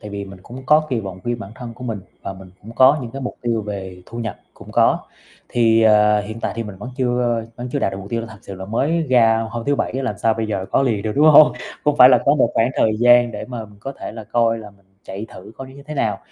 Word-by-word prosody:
Tại 105 - -9
vì 100 0 -5
mình 95 -1 -12
cũng 125 +5 -10
có 155 +1 +4
kỳ 120 - 0
vọng 95 -3 -8
riêng 120 0 -2
bản 100 -3 -8
thân 120 -1 -9
của 125 - -10
mình 110 -4 -4 0.2
và 95 - -5
mình 95 -1 -13
cũng 115 +3 -10
có 135 +4 +6
những 115 - -6
cái 135 - -7
mục 125 - -4
tiêu 115 -2 -1
về 95 -3 -7
thu 115 - -9
nhập 110 -5 -4 0.2
cũng - - -13
có. - - +3 0.5
Thì, 115 -1 +3
à, 105 -1 +5
hiện 110 +2 -7
tại - - -2
thì 115 - -2
mình 105 -3 -9
vẫn 120 +5 -7
chưa 120 -2 0
vẫn 125 +1 -6
chưa 145 - 0
đạt 95 - 0
được 95 - -5
mục 100 +1 -9
tiêu 115 - -1
là 115 - -6
thật 105 - -12
sự 100 - -9
là 95 - -9
đổi 95 - -7
mới 150 +10 0
ra 115 -2 +4
hôm 115 -1 -5
thứ 145 - +1
Bảy - - -2
á, 135 +1 -3
làm 105 -6 -3
sao 110 -1 +2
bây 110 0 -2
giờ 95 -3 -3
có - - +3
liền 110 -7 0
được, 110 - -2
đúng 150 - +5
hông? 150 +1 +8 0.3
Cũng 150 -1 +2
phải 125 -1 +9
là 125 - +6
có 140 - +4
một 130 -5 +2
khoảng 115 +3 +2
thời 110 - +3
gian 120 0 +5
để - - -6
mà 120 -3 -6
mình 105 -1 -17
có 135 +3 -6
thể - - -6
là 110 -1 -9
coi 115 0 +1
là 105 -2 -10
mình 100 -1 -27 0.2
chạy 100 +3 -7
thử 95 +4 -12
coi 135 - -7
nó 130 - -14
như 140 - -12
thế 155 - -6
nào. - - -1
115 Hz, 305 wpm, -20 LUFS, 105-125 Hz, 0.5 s, phải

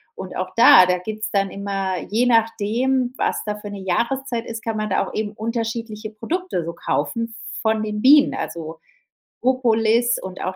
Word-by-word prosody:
Und 190 -1 -7
auch 185 0 -3
da 230 -5 +8
da 180 0 +1
gibt's 215 +4 -5
dann 195 -1 +1
immer 195 -2 -3
je 230 +4 +2
nachdem, 235 +3 +1
was - - -1
da 210 -1 -2
für 210 0 -8
'ne 205 -1 -7
Jahreszeit 235 +6 -1
ist, 230 0 -7
kann 225 -1 -2
man 215 0 -2
da 190 - +1
auch - - -9
eben 215 -1 -2
unterschiedliche 225 -1 -4
Produkte 330 - -3
so 170 +1 -5
kaufen 225 +13 -2 0.3
von 220 -1 +1
den 210 -1 -3
Bienen, 285 +2 +6
also, 160 0 -5 0.6
Propolis 235 -2 +2
und 185 -1 -7
auch 185 - -3
220 Hz, 175 wpm, -21 LUFS, 195-235 Hz, 0.6 s, da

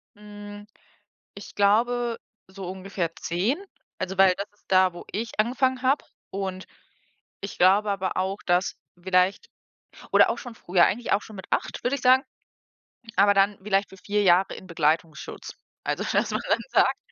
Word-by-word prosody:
Hm, 205 0 -11 0.7
ich - - -11
glaube, 235 +4 +2 0.3
so 190 -1 -8
ungefähr 185 -3 -4
10, 220 - -1 0.3
also 190 0 -4
weil 190 -1 +6
das 200 - -4
ist 205 - -34
da, 185 -1 +4
wo 175 - -10
ich 225 +2 -4
angefangen 255 +3 +1
habe 270 +3 +2 0.3
und 190 -1 -4 0.7
ich 195 - -7
glaube 200 +3 +4
aber 190 -2 -2
auch, 190 +2 -1
dass 180 +1 +1 0.3
vielleicht 190 - +1 0.6
oder - - +6
auch - - -1
schon 245 -2 -9
früher, 175 -4 +3
eigentlich 235 +4 -1
auch 200 - +2
schon 215 - -12
mit 190 - -8
8, - - -2
würde 250 +3 +1
ich 280 - -7
sagen, 255 +1 +5 0.9
aber 200 +1 +6
dann 200 0 +2
vielleicht 200 0 +1
für 190 - -14
4 205 +3 -1
Jahre 185 0 +4
in 185 - -11
Begleitungsschutz. 160 -1 -2 0.3
Also, - - -1
dass - - +1
man - - -1
dann - - +3
sagt - - +3
195 Hz, 165 wpm, -25 LUFS, 185-215 Hz, 0.9 s, weil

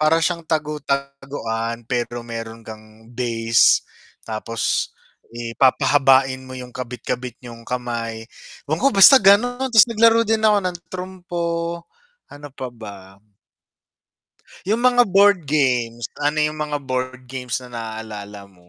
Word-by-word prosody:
para 155 +1 +4
siyang 170 0 -1
tagu-taguan 140 -6 -3
pero 120 -1 -2 0.2
meron 115 0 -7
kang 110 0 -10 0.3
base. 115 -2 +2 0.6
Tapos, 115 +1 -5 0.8
eh 115 -1 -5
papahabain 135 0 +4
mo - - -9
yung 125 -1 -10
kabit-kabit 125 0 -5
niyong 120 -2 -11
kamay. 120 -2 -3 0.5
Ewan 155 +2 -1
ko, 275 - +6
basta 235 +8 +10
ganun 245 +6 +3
tas 220 -4 +8
naglaro 230 0 +4
din 225 -1 +2
ako 210 -1 +4
ng 180 -1 -2 0.2
trumpo, 180 -2 -5 0.9
ano 145 0 -10
pa 130 - -4
ba? 100 -2 -8 1.7
Yung 225 +3 +1
mga 245 -1 +5
board 200 -1 +6 0.2
games, 120 -4 0 0.2
ano 150 +1 0
yung 155 0 -5
mga 150 -1 -3
board 130 0 -3
games 125 -2 -3
na - - -11
naalala 110 -2 -7 0.2
mo? 90 0 -24
130 Hz, 130 wpm, -21 LUFS, 115-170 Hz, 1.7 s, basta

